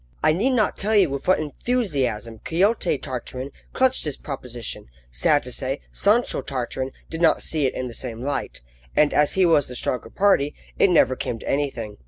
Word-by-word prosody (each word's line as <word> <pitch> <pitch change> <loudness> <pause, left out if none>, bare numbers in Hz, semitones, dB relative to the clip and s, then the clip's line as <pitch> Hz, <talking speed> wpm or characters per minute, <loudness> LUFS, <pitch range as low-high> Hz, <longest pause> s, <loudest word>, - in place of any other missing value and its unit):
I - - +5
need 235 +11 +1
not 220 -4 +1
tell 215 +2 0
you 190 -8 +5
with 140 0 -4
what 185 - +4
enthusiasm 140 - -2
Quixote 185 0 +1
Tartarin 130 +1 -6 0.2
clutched 260 0 +2
this 150 -3 -2
proposition; 125 - -6 0.2
sad 60 - +2
to 125 - -7
say, 135 +2 -2
Sancho 220 +5 +2
Tartarin 130 0 -3 0.2
did 160 - -4
not 160 -2 +4
see 150 -4 +1
it - - -4
in 130 - -3
the 120 - -6
same 115 -2 -5
light, 135 - -3 0.3
and, 150 -1 +4
as 150 -1 +3
he 190 -1 +4
was 155 -5 +4
the 125 - -7
stronger 125 +1 -2
party, 190 -8 +2 0.2
it - - +5
never 155 -7 +4
came 120 - -3
to - - -11
anything. 130 -7 -2
145 Hz, 190 wpm, -23 LUFS, 125-185 Hz, 0.3 s, I